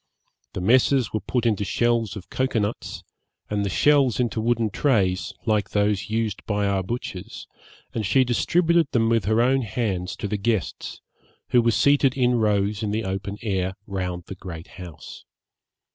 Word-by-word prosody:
The 95 - -4
messes 125 +3 +3
were 110 - 0
put 120 +4 -2
into 105 -3 +1
shells 115 -1 0
of 100 -4 -10
cocoa 130 -2 0
nuts, 105 +1 -3 0.5
and 105 -1 0
the 100 - -1
shells 140 - +3
into 120 -2 0
wooden 115 -1 +1
trays, 95 - +1
like 105 -3 +1
those 105 -1 0
used 110 -2 -2
by 105 -1 0
our 100 -1 +1
butchers, 100 0 -6 0.5
and 110 - -2
she 105 +7 +3
distributed 165 +7 +2
them 115 -1 +3
with 115 -1 +2
her 110 +3 +3
own 135 +2 +3
hands 100 -5 -2
to - - -4
the 105 - -2
guests, 100 -5 -2 0.5
who 120 - +5
were 115 - +2
seated 140 +2 +3
in 125 -2 +2
rows 105 -1 +1
in 105 - -1
the 110 +2 -1
open 100 +1 -4
air, 95 -3 -1
round 90 -3 -4
the - - -7
great 90 -3 -9
house. 90 -5 -10
110 Hz, 170 wpm, -24 LUFS, 95-120 Hz, 0.5 s, who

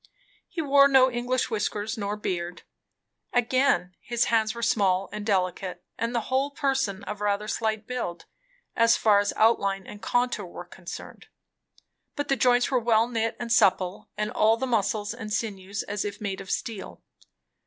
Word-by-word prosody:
He 335 -2 -3
wore 280 -1 +6
no 265 -2 +5
English 245 +1 -1
whiskers 215 0 -2
nor 205 -2 -3
beard. 175 -3 -4 0.7
Again, 245 -6 +2
his 240 -1 0
hands 220 0 +2
were 235 - -5
small 195 -4 +2
and 210 - -5
delicate, 185 -3 -1
and 230 +1 -2
the 235 - +2
whole 265 +4 0
person 270 -8 -1
of 210 0 -6
rather 205 0 0
slight 220 -1 -1
build, 245 -9 -4 0.5
as 230 0 +4
far 210 -2 +4
as 205 0 0
outline 200 -4 +2
and 210 - -10
contour 245 -2 0
were 175 - -9
concerned; 175 0 -10 0.9
but 290 - -3
the 275 - +4
joints 245 +1 +3
were 255 - +3
well 230 -1 +3
knit 225 -2 -1
and 235 -1 -4
supple, 185 -4 +2
and 210 0 -1
all 220 +1 +3
the 265 - -2
muscles 215 -3 0
and 215 -1 -7
sinews 200 -2 -3
as 205 0 -3
if 205 -1 -5
made 195 -2 -4
of 195 - -11
steel. 215 -3 -4
220 Hz, 165 wpm, -26 LUFS, 200-245 Hz, 0.9 s, wore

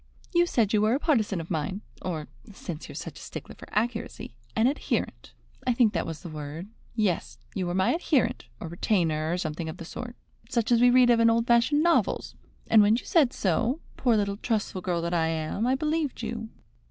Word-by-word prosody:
You 345 0 +4
said 225 - +1
you 210 - +4
were 215 +3 +3
a - - 0
partisan 220 - +1
of 165 +2 -7
mine, 170 +5 -2 0.2
or, 160 -5 -4 0.2
since 175 -5 -7
you - - -8
are - - -13
such - - -7
a - - -12
stickler - - -8
for - - -13
accuracy, 225 - -2 0.2
an 220 - +3
adherent 275 +4 -1 0.4
I 250 - +4
think 230 -3 +4
that 165 - -1
was 160 -2 -6
the 175 - -6
word 155 +4 -7 0.3
yes, 210 -6 0 0.2
you 185 -2 -2
were 175 - -2
my 190 +6 +3
adherent, 310 - +1
or - - -6
retainer, 165 -3 0
or 175 - 0
something 160 -1 -3
of 160 - -7
the 170 - -8
sort, 240 +7 -7 0.3
such 235 -1 0
as 235 -1 +5
we 245 - +7
read 245 0 +6
of 235 - +4
in 230 0 +6
old 230 0 +2
fashioned 240 +6 +4
novels, 340 -1 +2 0.3
and 220 - +6
when 210 +2 +5
you 240 - -4
said 295 -8 +4
so, 225 - 0 0.2
poor 240 -4 +2
little 200 -1 0
trustful 210 -4 -2
girl 175 -2 -1
that 170 +1 -2
I 165 -2 +2
am, 160 +7 -1
I 260 - +3
believed 305 -2 -1
you." 225 0 -4
215 Hz, 215 wpm, -27 LUFS, 170-240 Hz, 0.4 s, we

